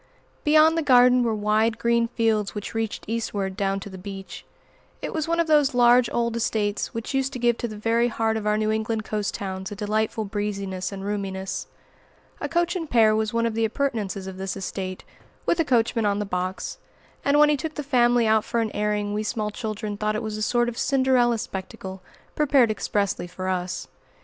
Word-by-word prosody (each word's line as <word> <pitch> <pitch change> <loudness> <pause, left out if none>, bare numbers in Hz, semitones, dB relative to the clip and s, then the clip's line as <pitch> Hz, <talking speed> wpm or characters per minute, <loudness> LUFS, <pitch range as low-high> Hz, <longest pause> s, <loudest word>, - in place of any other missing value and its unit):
Beyond 310 +2 +5
the 330 - +1
garden 250 -3 +6
were 230 -2 +1
wide 215 +2 +1
green 235 0 +2
fields 225 -3 0
which 205 - -5
reached 225 -1 -3
eastward 205 -4 -2
down 195 0 0
to - - -7
the 190 -2 -9
beach. 195 0 -8 0.6
It - - -5
was 315 -1 -1
one 335 0 +1
of 335 - +3
those 295 -5 +3
large 245 0 +5
old 235 -1 0
estates 215 -3 -1
which 230 +3 -5
used 270 0 0
to - - -3
give 240 -1 +2
to 240 - -2
the 215 -2 -8
very 230 +2 +2
heart 225 -1 0
of 215 -1 -2
our 210 0 +2
New 215 0 +1
England 220 0 -1
coast 210 -2 -2
towns 190 -1 -5
a - - -5
delightful 215 +1 -1
breeziness 200 -2 -3
and 195 -1 -6
roominess. 195 -2 -3 0.7
A - - -3
coach 345 +1 +1
and 330 -4 -4
pair 220 -3 +5
was 215 -1 0
one 230 0 +1
of 230 - 0
the 225 +1 0
appurtenances 220 -5 -1
of 190 -1 -7
this 190 0 -4
estate, 185 -1 -5 0.4
with 340 - +1
a - - +5
coachman 230 -5 +2
on 200 0 +1
the 210 - -2
box; 185 0 -3 0.4
and 280 +1 +3
when 300 0 +6
he 300 - +4
took 310 +2 -5
the 295 - -3
family 245 -3 +3
out 220 -1 +3
for 235 - -1
an 225 -2 0
airing 210 0 -1
we 210 - -1
small 215 -1 -2
children 215 -2 -4
thought 215 +1 -1
it 215 - -2
was 215 -1 -3
a 215 - -5
sort 240 +2 +2
of 240 -1 -4
Cinderella 260 -3 +3
spectacle, 190 -2 -6 0.3
prepared 275 -6 +3
expressly 200 -4 -1
for 185 +1 -6
us. 180 -1 -2
220 Hz, 210 wpm, -24 LUFS, 205-240 Hz, 0.7 s, garden